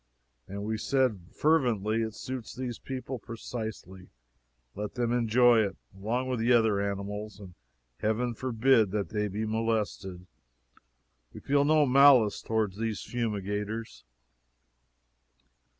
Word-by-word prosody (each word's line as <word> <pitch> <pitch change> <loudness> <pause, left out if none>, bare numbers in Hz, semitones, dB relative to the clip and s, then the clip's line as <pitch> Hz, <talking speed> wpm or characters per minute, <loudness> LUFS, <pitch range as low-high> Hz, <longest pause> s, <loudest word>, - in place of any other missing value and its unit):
And 100 +1 -6
we 110 +1 -2
said 125 -9 0
fervently: 115 -8 +1
it 110 -1 -3
suits 125 -2 -6
these 125 -2 -5
people 130 -1 -6
precisely; 110 -5 -7 0.6
let 105 0 -6
them 120 -2 0
enjoy 120 0 +4
it, 100 -2 -4 0.2
along 115 +6 -2
with 130 -2 -2
the 115 +2 +2
other 110 -4 +3
animals, 100 +1 -4
and 95 -3 -11 0.5
Heaven 115 +3 0
forbid 120 -2 +2
that 100 0 -2
they 105 -1 -1
be 105 +3 -3
molested. 110 -5 -2 1.1
We - - -9
feel 140 +1 +2
no 155 0 +4
malice 130 -5 +5
toward 110 -3 -1
these 110 -1 -3
fumigators. 105 -1 -4
110 Hz, 120 wpm, -29 LUFS, 105-125 Hz, 1.1 s, malice